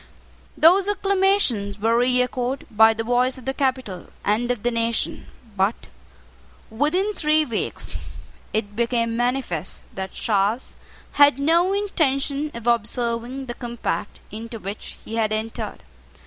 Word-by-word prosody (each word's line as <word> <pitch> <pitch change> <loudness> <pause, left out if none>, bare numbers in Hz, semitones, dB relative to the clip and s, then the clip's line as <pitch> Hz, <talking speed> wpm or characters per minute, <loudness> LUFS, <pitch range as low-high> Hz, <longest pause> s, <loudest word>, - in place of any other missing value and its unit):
Those 365 +5 +6
acclamations 385 - +1
were 225 +2 +2
reechoed 250 +1 +1
by 220 +1 +6
the 225 - -2
voice 245 +2 +1
of 255 - -11
the 265 - -1
capital 260 -10 -2 0.2
and 225 +4 +1
of 245 -4 -1
the 240 - +1
nation; 230 0 -1 0.3
but 195 +3 0 0.8
within 330 - +1
three 310 -3 +2
weeks 230 -6 -4 0.5
it 205 -1 -2
became 230 0 0
manifest 240 - -1
that 190 -1 -5
Charles 210 +3 0 0.4
had 285 -2 +6
no 335 +6 +3
intention 300 -7 0
of 235 -1 -7
observing 235 +2 0
the 240 - -5
compact 240 -1 -4
into 225 +2 -7
which 200 0 -7
he 225 - -5
had 215 -1 +1
entered. 220 +1 -4
240 Hz, 130 wpm, -23 LUFS, 225-280 Hz, 0.8 s, Those